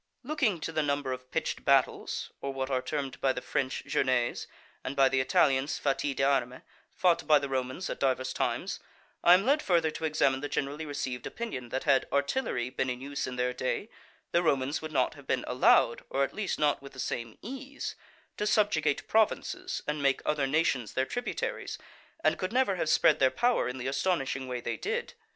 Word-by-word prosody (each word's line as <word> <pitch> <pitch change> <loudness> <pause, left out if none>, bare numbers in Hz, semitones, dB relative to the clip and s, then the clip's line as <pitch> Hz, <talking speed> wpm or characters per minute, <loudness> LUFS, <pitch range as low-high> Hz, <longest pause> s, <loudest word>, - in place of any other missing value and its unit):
_ - - -15
Looking 265 - +1
to 165 - -3
the 155 -1 0
number 140 -2 -1
of 130 0 -9
pitched - - -2
battles, - - +1
or 140 - -3
what 135 0 -3
are 130 -1 +1
termed 140 -1 -4
by 135 -1 +3
the - - -3
French 130 -1 -2
journées, 130 -2 0 0.4
and 135 - -4
by 135 -1 +6
the 135 - +1
Italians 140 -2 +2
fatti 140 0 0
d'arme, 135 -2 +1 0.3
fought 170 -4 +2
by 155 -1 +7
the 140 -1 -2
Romans 130 +6 -2
at - - -5
divers 130 -1 0
times, - - -2 0.4
I 175 - +9
am 195 +3 +1
led 285 +3 +3
further 165 -3 +2
to 155 +1 -4
examine 140 -4 +2
the 145 - -4
generally 145 +3 -2
received 130 -4 -4
opinion, 175 - -5
that 130 +2 -2
had 140 -3 +3
artillery 140 - 0
been 130 - -1
in 125 0 -3
use 140 +1 -4
in 125 - -5
their 125 0 0
day, 130 - -2 0.4
the 170 - +3
Romans 140 -3 +1
would 155 0 -6
not 130 -4 +1
have 145 -3 -15
been 130 - 0
allowed, 125 -2 +4
or 140 - +1
at - - -2
least 210 -4 -2
not 145 -2 +2
with 140 0 -11
the 130 - -11
same 115 -3 -4
ease, 270 +4 -6 0.4
to 210 - -1
subjugate 205 -9 +2
provinces 365 - 0
and 150 0 -2
make 135 -1 +2
other 150 -3 +1
nations 135 -6 +1
their 130 - +1
tributaries, 245 - -3 0.5
and - - +2
could 185 +1 -2
never 250 -5 +2
have 165 -3 -1
spread - - +4
their 130 - +5
power 240 - +1
in 125 - -5
the 125 - -5
astonishing 135 -2 -1
way 125 -1 -3
they - - -3
did. 475 +3 -3
140 Hz, 200 wpm, -29 LUFS, 130-175 Hz, 0.5 s, I